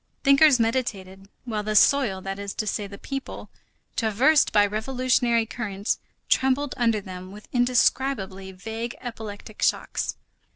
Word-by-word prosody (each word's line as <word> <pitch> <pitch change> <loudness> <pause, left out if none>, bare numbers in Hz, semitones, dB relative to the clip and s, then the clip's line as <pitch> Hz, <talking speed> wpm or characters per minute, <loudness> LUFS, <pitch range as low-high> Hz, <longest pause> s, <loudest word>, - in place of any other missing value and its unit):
Thinkers 275 -1 +6
meditated, 200 -5 -2 0.2
while 220 -3 -2
the 215 0 -3
soil, 215 -4 +4
that 195 +1 -5
is 200 0 -5
to 215 - -2
say, 205 0 -2
the 200 0 -10
people, 270 +4 -7 0.4
traversed 245 +7 +3
by 205 -1 +5
revolutionary 235 +2 +1
currents, 205 -3 -3 0.3
trembled 265 +1 +2
under 230 -4 +1
them 185 -1 -9
with 210 +1 -12
indescribably 245 -5 +1
vague 225 +5 -6
epileptic 220 -3 -8
shocks. - - 0
220 Hz, 130 wpm, -25 LUFS, 200-255 Hz, 0.4 s, Thinkers